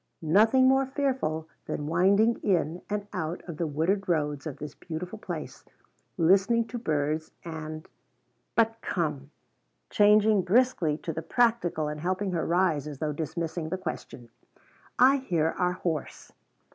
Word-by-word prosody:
Nothing 220 Hz, +11 st, +5 dB
more 265 Hz, 0 st, +3 dB
fearful 260 Hz, -, -1 dB, 0.2 s
than 145 Hz, -, -3 dB
winding 195 Hz, +8 st, +3 dB
in 175 Hz, -3 st, 0 dB
and 205 Hz, -1 st, -2 dB
out 160 Hz, +3 st, -3 dB
of 170 Hz, -4 st, -6 dB
the 170 Hz, -, -1 dB
wooded 175 Hz, +7 st, 0 dB
roads 150 Hz, -2 st, 0 dB
of 145 Hz, -, -6 dB
this 150 Hz, -1 st, -7 dB
beautiful 175 Hz, +7 st, -7 dB
place -, -, -7 dB, 0.5 s
listening 195 Hz, +7 st, +4 dB
to 240 Hz, -, -4 dB
birds 155 Hz, -4 st, -1 dB, 0.2 s
and 155 Hz, -1 st, -6 dB, 0.7 s
but 225 Hz, 0 st, +2 dB
come 150 Hz, -6 st, -2 dB, 0.3 s
" -, -, -48 dB
changing 210 Hz, 0 st, +5 dB
briskly 185 Hz, -6 st, +2 dB
to 165 Hz, 0 st, -5 dB
the 160 Hz, -, -4 dB
practical 220 Hz, -7 st, +1 dB
and 150 Hz, 0 st, -4 dB
helping 185 Hz, +3 st, -1 dB
her 170 Hz, -3 st, -1 dB
rise 170 Hz, -4 st, +1 dB
as 145 Hz, -2 st, -7 dB
though 150 Hz, +1 st, -2 dB
dismissing 160 Hz, +1 st, -4 dB
the 185 Hz, -, -2 dB
question 155 Hz, -8 st, -7 dB, 0.7 s
"I 270 Hz, +2 st, +6 dB
hear 170 Hz, -, 0 dB
our 180 Hz, -1 st, +2 dB
horse." 165 Hz, -4 st, -4 dB
175 Hz, 145 wpm, -28 LUFS, 155-210 Hz, 0.7 s, I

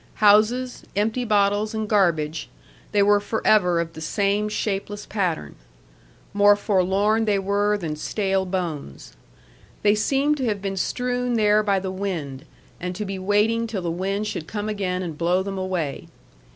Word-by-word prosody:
Houses, 220 Hz, +4 st, +3 dB
empty 220 Hz, +5 st, 0 dB
bottles, 205 Hz, 0 st, +1 dB
and 220 Hz, -1 st, -2 dB
garbage, 165 Hz, -7 st, +1 dB, 0.4 s
they 205 Hz, -1 st, +3 dB
were 205 Hz, 0 st, +4 dB
forever 205 Hz, -4 st, +2 dB
of 165 Hz, 0 st, -3 dB
the 160 Hz, -, -9 dB
same 200 Hz, +4 st, 0 dB
shapeless 205 Hz, 0 st, -3 dB
pattern. 175 Hz, -, -2 dB, 0.8 s
More 205 Hz, 0 st, +6 dB
forlorn 205 Hz, +2 st, +1 dB
they 205 Hz, -2 st, +2 dB
were 205 Hz, +2 st, +1 dB
than 165 Hz, -6 st, -4 dB
stale 190 Hz, +3 st, -1 dB
bones. 165 Hz, -, -5 dB, 0.7 s
They 205 Hz, 0 st, +5 dB
seemed 275 Hz, +7 st, +1 dB
to 265 Hz, -, -2 dB
have 210 Hz, -3 st, -1 dB
been 195 Hz, 0 st, -3 dB
strewn 245 Hz, +4 st, -1 dB
there 210 Hz, -1 st, +4 dB
by 200 Hz, -2 st, +1 dB
the 190 Hz, 0 st, -4 dB
wind 165 Hz, -8 st, -4 dB, 0.3 s
and 180 Hz, +1 st, -4 dB
to 210 Hz, -, -4 dB
be 195 Hz, -1 st, -4 dB
waiting 210 Hz, +4 st, +1 dB
till 205 Hz, -5 st, -4 dB
the 170 Hz, -, -1 dB
wind 195 Hz, +4 st, -2 dB
should 165 Hz, -6 st, -4 dB
come 210 Hz, 0 st, -4 dB
again 185 Hz, -3 st, -2 dB
and 165 Hz, -3 st, -5 dB
blow 175 Hz, +2 st, +2 dB
them 195 Hz, 0 st, -4 dB
away. 180 Hz, -7 st, -3 dB
200 Hz, 160 wpm, -23 LUFS, 185-210 Hz, 0.8 s, More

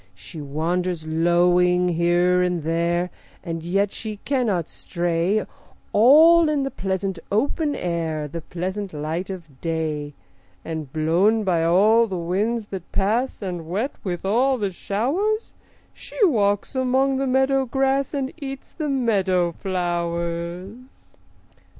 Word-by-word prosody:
She 105 Hz, -, -10 dB
wanders 165 Hz, +4 st, -2 dB
lowing 175 Hz, +2 st, +3 dB
here 175 Hz, +1 st, +2 dB
and 180 Hz, -3 st, 0 dB
there, 170 Hz, +2 st, 0 dB, 0.3 s
And 165 Hz, -2 st, -4 dB
yet 195 Hz, +4 st, 0 dB
she 215 Hz, -2 st, -6 dB
cannot 225 Hz, -, 0 dB
stray, 175 Hz, +4 st, -1 dB, 0.5 s
All 315 Hz, +8 st, +7 dB
in 295 Hz, -2 st, +1 dB
the 270 Hz, -, -3 dB
pleasant 190 Hz, -1 st, -3 dB
open 290 Hz, -, 0 dB
air, 165 Hz, -3 st, -2 dB
The 165 Hz, +3 st, -6 dB
pleasant 185 Hz, +3 st, -5 dB
light 155 Hz, +5 st, -3 dB
of 165 Hz, -8 st, -9 dB
day; 155 Hz, -3 st, -3 dB, 0.5 s
And 160 Hz, -4 st, -5 dB
blown 175 Hz, +9 st, +2 dB
by 175 Hz, -4 st, +1 dB
all 210 Hz, +7 st, +4 dB
the 190 Hz, -3 st, -4 dB
winds 205 Hz, +7 st, -1 dB
that 190 Hz, -3 st, -7 dB
pass 225 Hz, +4 st, 0 dB
And 175 Hz, -4 st, -5 dB
wet 215 Hz, +10 st, -1 dB
with 180 Hz, -2 st, -4 dB
all 255 Hz, +7 st, +2 dB
the 205 Hz, -4 st, -2 dB
showers, 315 Hz, -, -1 dB, 0.4 s
She -, -, -13 dB
walks 205 Hz, -, +1 dB
among 265 Hz, +1 st, +1 dB
the 270 Hz, 0 st, -1 dB
meadow 265 Hz, +1 st, +2 dB
grass 270 Hz, +1 st, +1 dB
And 275 Hz, -2 st, -3 dB
eats 270 Hz, -1 st, -7 dB
the 305 Hz, -3 st, -4 dB
meadow 195 Hz, -9 st, +1 dB
flowers. 175 Hz, -, -4 dB
185 Hz, 130 wpm, -23 LUFS, 170-240 Hz, 0.5 s, All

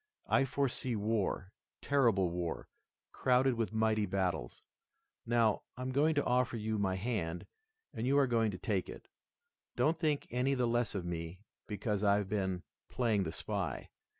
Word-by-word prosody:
I 135 Hz, -, +4 dB
foresee 130 Hz, -2 st, -1 dB
war, 105 Hz, -2 st, -1 dB, 0.3 s
terrible 115 Hz, -11 st, +3 dB
war, 85 Hz, -1 st, -3 dB, 0.4 s
crowded 130 Hz, +1 st, +3 dB
with 115 Hz, -2 st, -1 dB
mighty 110 Hz, -1 st, +1 dB
battles. 90 Hz, -8 st, -2 dB, 0.6 s
Now, 115 Hz, -3 st, +3 dB, 0.2 s
I'm 130 Hz, +1 st, -3 dB
going 150 Hz, +4 st, +3 dB
to 145 Hz, -, +1 dB
offer 125 Hz, -1 st, +1 dB
you 110 Hz, 0 st, -2 dB
my 95 Hz, -2 st, +1 dB
hand 95 Hz, -5 st, -2 dB, 0.5 s
and 115 Hz, +3 st, -2 dB
you 140 Hz, +2 st, +3 dB
are 140 Hz, -, +5 dB
going 115 Hz, -3 st, +2 dB
to 95 Hz, -, -5 dB
take 100 Hz, -3 st, -1 dB
it. -, -, -10 dB, 0.7 s
Don't 160 Hz, +2 st, +2 dB
think 155 Hz, -4 st, +1 dB
any 125 Hz, +3 st, +1 dB
the 125 Hz, -1 st, +1 dB
less 120 Hz, -2 st, 0 dB
of 90 Hz, -3 st, -3 dB
me 85 Hz, +1 st, -5 dB, 0.3 s
because 105 Hz, 0 st, -2 dB
I've 100 Hz, -1 st, +3 dB
been 95 Hz, -3 st, -1 dB, 0.3 s
playing 110 Hz, -6 st, +1 dB
the 80 Hz, -, -3 dB
spy. -, -, -3 dB
110 Hz, 155 wpm, -33 LUFS, 95-125 Hz, 0.7 s, are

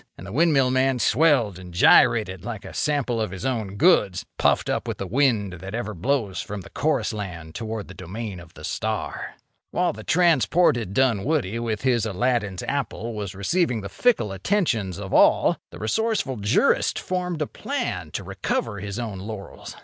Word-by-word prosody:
And 90 Hz, -, -10 dB
the 100 Hz, -, -8 dB
windmill 140 Hz, -1 st, +3 dB
man 130 Hz, 0 st, +2 dB
swelled 120 Hz, -, +3 dB
and 90 Hz, -1 st, -10 dB
gyrated 95 Hz, 0 st, +5 dB
like 115 Hz, -2 st, -6 dB
a -, -, -9 dB
sample 135 Hz, -6 st, 0 dB
of 110 Hz, -, -1 dB
his 95 Hz, +6 st, -7 dB
own 110 Hz, -7 st, -2 dB
goods, 100 Hz, -, +3 dB
puffed -, -, +2 dB
up -, -, -1 dB
with -, -, -3 dB
the 100 Hz, -, -4 dB
wind 110 Hz, -3 st, +1 dB
that 95 Hz, +4 st, -6 dB
ever 110 Hz, -2 st, -3 dB
blows 100 Hz, -2 st, -1 dB
from 105 Hz, 0 st, -6 dB
the -, -, -13 dB
chorus 155 Hz, -4 st, 0 dB
land 85 Hz, -6 st, -6 dB
toward 110 Hz, -2 st, -5 dB
the 95 Hz, -, -10 dB
domain 95 Hz, +2 st, -6 dB
of 85 Hz, -1 st, -15 dB
the -, -, -12 dB
star. -, -, -3 dB, 0.3 s
While -, -, 0 dB
the 110 Hz, -, -9 dB
transported 160 Hz, -, +3 dB
Dunwoody, 125 Hz, -2 st, +1 dB
with 115 Hz, -1 st, -3 dB
his 120 Hz, -4 st, +2 dB
Aladdin's 105 Hz, -3 st, -1 dB
apple, 120 Hz, -4 st, -3 dB
was 100 Hz, -3 st, -5 dB
receiving 120 Hz, -, 0 dB
the 100 Hz, -, -6 dB
fickle 210 Hz, -, +1 dB
attentions 110 Hz, -, 0 dB
of 100 Hz, -1 st, -6 dB
all, -, -, +5 dB
the -, -, -11 dB
resourceful 140 Hz, -, -1 dB
jurist 105 Hz, +1 st, +2 dB
formed 180 Hz, -3 st, -2 dB
a -, -, -2 dB
plan -, -, -4 dB
to -, -, -3 dB
recover 100 Hz, -, -2 dB
his 100 Hz, +2 st, -5 dB
own 110 Hz, -6 st, -4 dB
laurels. 100 Hz, 0 st, -8 dB
110 Hz, 175 wpm, -24 LUFS, 100-135 Hz, 0.3 s, gyrated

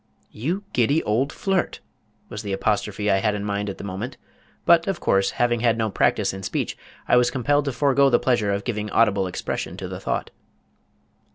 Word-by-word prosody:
"You 170 Hz, -, -3 dB
giddy 140 Hz, +6 st, +2 dB
old 125 Hz, +7 st, +1 dB
flirt!" 195 Hz, -2 st, -1 dB, 0.5 s
was 105 Hz, -, -6 dB
the 100 Hz, -3 st, -4 dB
apostrophe 105 Hz, 0 st, 0 dB
I 95 Hz, -, +4 dB
had 105 Hz, +1 st, +1 dB
in 105 Hz, 0 st, -4 dB
mind 100 Hz, 0 st, -2 dB
at 95 Hz, -, -6 dB
the -, -, -8 dB
moment, 100 Hz, +6 st, -5 dB, 0.5 s
but, 170 Hz, -1 st, +5 dB
of 195 Hz, -3 st, -1 dB
course, 95 Hz, 0 st, +2 dB
having 120 Hz, -1 st, +2 dB
had 115 Hz, -1 st, +2 dB
no 110 Hz, -2 st, 0 dB
practice -, -, +1 dB
in 95 Hz, -, -7 dB
speech -, -, -2 dB, 0.3 s
I -, -, +4 dB
was 125 Hz, 0 st, +4 dB
compelled 145 Hz, +3 st, +1 dB
to 140 Hz, -, 0 dB
forego 140 Hz, +2 st, +3 dB
the 120 Hz, -, +5 dB
pleasure 120 Hz, -6 st, +1 dB
of 100 Hz, 0 st, -1 dB
giving 105 Hz, -3 st, -3 dB
audible 100 Hz, -3 st, +2 dB
expression 90 Hz, -, -4 dB
to -, -, -5 dB
the -, -, -6 dB
thought. -, -, -3 dB
115 Hz, 195 wpm, -23 LUFS, 100-135 Hz, 0.5 s, but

